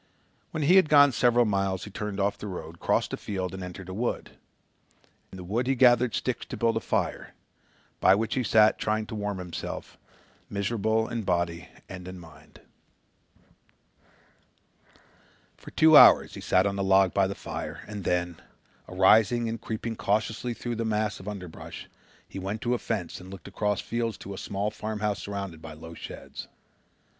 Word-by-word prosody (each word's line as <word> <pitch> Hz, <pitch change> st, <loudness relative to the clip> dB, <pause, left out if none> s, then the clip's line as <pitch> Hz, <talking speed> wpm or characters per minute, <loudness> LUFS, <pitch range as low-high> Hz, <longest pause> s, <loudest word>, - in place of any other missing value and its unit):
When 155 Hz, -, -3 dB
he 175 Hz, +6 st, +6 dB
had 185 Hz, -5 st, +5 dB
gone 145 Hz, -1 st, +7 dB
several 120 Hz, 0 st, +3 dB
miles 95 Hz, -3 st, 0 dB
he 105 Hz, -, -8 dB
turned 105 Hz, 0 st, -4 dB
off 100 Hz, +1 st, +1 dB
the 105 Hz, -, -8 dB
road, 85 Hz, -3 st, -7 dB
crossed -, -, 0 dB
a -, -, -2 dB
field 95 Hz, -3 st, -4 dB
and 95 Hz, -1 st, -6 dB
entered 90 Hz, +1 st, -8 dB
a 95 Hz, -, -6 dB
wood. 120 Hz, +5 st, -3 dB, 1.0 s
In 95 Hz, -, -10 dB
the 90 Hz, -, -8 dB
wood 115 Hz, +8 st, -1 dB
he 135 Hz, -, +2 dB
gathered 120 Hz, -1 st, +4 dB
sticks 130 Hz, -, -2 dB
to -, -, -6 dB
build 115 Hz, -1 st, +1 dB
a -, -, +1 dB
fire, -, -, -2 dB, 0.6 s
by 95 Hz, -, +6 dB
which 110 Hz, +2 st, -1 dB
he 130 Hz, -, 0 dB
sat 110 Hz, -1 st, +4 dB
trying 110 Hz, 0 st, 0 dB
to -, -, -9 dB
warm 105 Hz, -2 st, -3 dB
himself, 90 Hz, -2 st, -7 dB, 0.5 s
miserable 110 Hz, +2 st, 0 dB
in 115 Hz, -1 st, -3 dB
body 85 Hz, -4 st, -1 dB, 0.2 s
and 90 Hz, -1 st, -9 dB
in 95 Hz, 0 st, -7 dB
mind. 80 Hz, -4 st, -15 dB, 2.9 s
For -, -, -12 dB
two 160 Hz, 0 st, +5 dB
hours -, -, +8 dB
he -, -, -8 dB
sat 95 Hz, +1 st, +3 dB
on 100 Hz, 0 st, -1 dB
the 100 Hz, -, 0 dB
log 95 Hz, -1 st, +4 dB
by 95 Hz, -1 st, +3 dB
the 100 Hz, -, -4 dB
fire -, -, -6 dB
and 105 Hz, -2 st, -6 dB
then, 90 Hz, -1 st, -1 dB, 0.5 s
arising 110 Hz, +5 st, +4 dB
and 115 Hz, 0 st, -4 dB
creeping 115 Hz, +1 st, -4 dB
cautiously 110 Hz, +3 st, -1 dB
through 120 Hz, -1 st, -4 dB
a -, -, 0 dB
mass 110 Hz, -1 st, -1 dB
of 95 Hz, -, -11 dB
underbrush, 95 Hz, -5 st, -8 dB, 0.4 s
he -, -, -7 dB
went 100 Hz, +4 st, -4 dB
to 120 Hz, 0 st, 0 dB
a 120 Hz, -, 0 dB
fence 100 Hz, -7 st, -4 dB
and 90 Hz, -, -11 dB
looked 95 Hz, -3 st, -10 dB
across 105 Hz, -2 st, -1 dB
fields 115 Hz, -2 st, -2 dB
to 100 Hz, -, -8 dB
a -, -, -8 dB
small 100 Hz, +1 st, -2 dB
farmhouse 105 Hz, -3 st, -3 dB
surrounded 100 Hz, -4 st, -6 dB
by 80 Hz, -1 st, -9 dB
low 80 Hz, +2 st, -10 dB
sheds. -, -, -9 dB
105 Hz, 180 wpm, -27 LUFS, 95-115 Hz, 2.9 s, hours